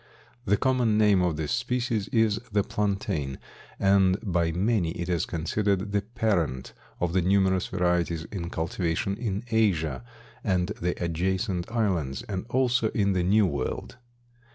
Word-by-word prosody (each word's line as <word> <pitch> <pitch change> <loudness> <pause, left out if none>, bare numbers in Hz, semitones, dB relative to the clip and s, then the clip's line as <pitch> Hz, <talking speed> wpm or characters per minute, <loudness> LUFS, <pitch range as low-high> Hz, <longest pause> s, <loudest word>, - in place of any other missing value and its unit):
The 100 0 +3
common 125 -4 +2
name 105 -3 +4
of 85 -4 0
this 80 -2 -3
species 120 -3 -1
is 110 -2 +2
the 100 -1 +2
plantain 95 -11 -2 0.4
and 95 -1 +4
by 85 -5 +1
many 90 -1 +1
it 85 - -4
is 85 -2 0
considered 100 +4 -1
the 100 0 +1
parent 100 - -1 0.3
of 85 -1 -1
the 95 - +3
numerous 95 0 +2
varieties 85 -2 0
in 85 -4 -4
cultivation 85 +3 -1
in 105 -2 -3
Asia 80 - +1 0.4
and 90 -1 +1
the 90 +1 0
adjacent 90 +3 -1
islands 90 - -1
and 100 +1 -5
also 125 -3 +2
in 100 -2 +2
the 90 - +1
New 100 +4 +4
World. 85 - -3
95 Hz, 145 wpm, -27 LUFS, 85-105 Hz, 0.4 s, name